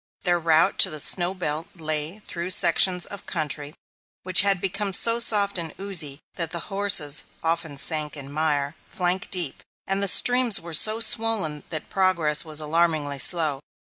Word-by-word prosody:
Their 175 -2 +1
route 160 -1 +1
to - - +5
the 155 - -7
snow 175 +5 +2
belt 160 -2 -4
lay 155 +1 -5
through 170 +1 -7
sections 180 0 +3
of 200 - -12
country 150 -3 -4 0.5
which 185 0 +3
had 200 -2 +1
become 200 +1 -4
so 230 +5 +2
soft 205 -5 +3
and 165 -2 -7
oozy 160 -8 -2
that 170 -2 -4
the 175 - -6 0.2
horses 180 -8 +3 0.2
often 165 -3 -3
sank 150 0 -1
in 140 -1 -9
mire, 145 -2 -2
flank 180 0 -4
deep; 175 -7 -2 0.2
and 195 +1 -2
the 200 - +1
streams 245 +2 +5
were 170 0 -11
so 215 +8 +4
swollen 220 -10 0
that 155 -3 -6
progress 170 -6 +1
was 155 -2 0
alarmingly 155 -2 -1
slow. 155 -2 +2
170 Hz, 165 wpm, -22 LUFS, 150-195 Hz, 0.5 s, to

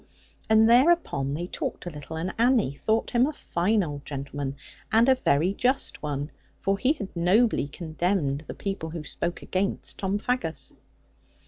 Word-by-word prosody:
And 220 0 +6
thereupon 235 - +3
they 170 +3 -3
talked 180 - -4
a 175 - -4
little; 150 +1 -8
and 170 +4 -3
Annie 235 - +4
thought 220 +10 0
him 245 +1 +4
a - - -1
fine 205 - 0
old 145 -3 -5
gentleman, 140 -1 -5 0.4
and 225 +2 +5
a 265 - +7
very 180 - +2
just 255 +6 +1
one; 145 0 -3 0.3
for 195 0 0
he 260 +6 +3
had 200 -12 -8
nobly 185 - +3
condemned 155 -2 -1
the - - -6
people 195 -5 -4
who 160 -1 -6
spoke 170 +2 -3
against 195 +1 -2
Tom 195 +1 0
Faggus. 205 -8 -2
185 Hz, 160 wpm, -26 LUFS, 150-225 Hz, 0.4 s, a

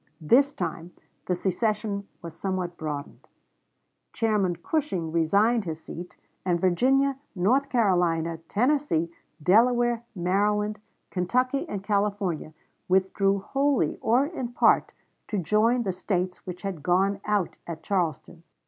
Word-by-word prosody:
This 250 - +4
time 170 - -5 0.3
the 180 - +1
secession 200 +2 -1 0.2
was 165 -1 -8
somewhat 185 -1 -3
broadened; 150 -3 -6 0.9
Chairman 210 -6 +1
Cushing 175 - -2
resigned 200 +7 +2
his 160 -2 -4
seat, 175 +1 -9 0.3
and 175 -2 +1
Virginia, 265 +10 +2 0.2
North 255 +10 +2
Carolina, 175 -7 +1
Tennessee, 245 - +1 0.3
Delaware, 240 +5 +4
Maryland, 210 +4 +1 0.3
Kentucky, 250 +9 0
and 195 -2 -4
California 200 -6 -1 0.4
withdrew 190 +1 +2
wholly 275 - 0
or 245 +5 +3
in 260 -7 -5
part - - +4 0.4
to 210 - -2
join 215 +7 +2
the 195 - -1
States 185 0 -3
which 180 +1 -7
had 190 -6 -4
gone 195 +5 +1
out 205 -4 0
at 160 -1 -6
Charleston. 170 -3 -2
195 Hz, 120 wpm, -26 LUFS, 175-230 Hz, 0.9 s, This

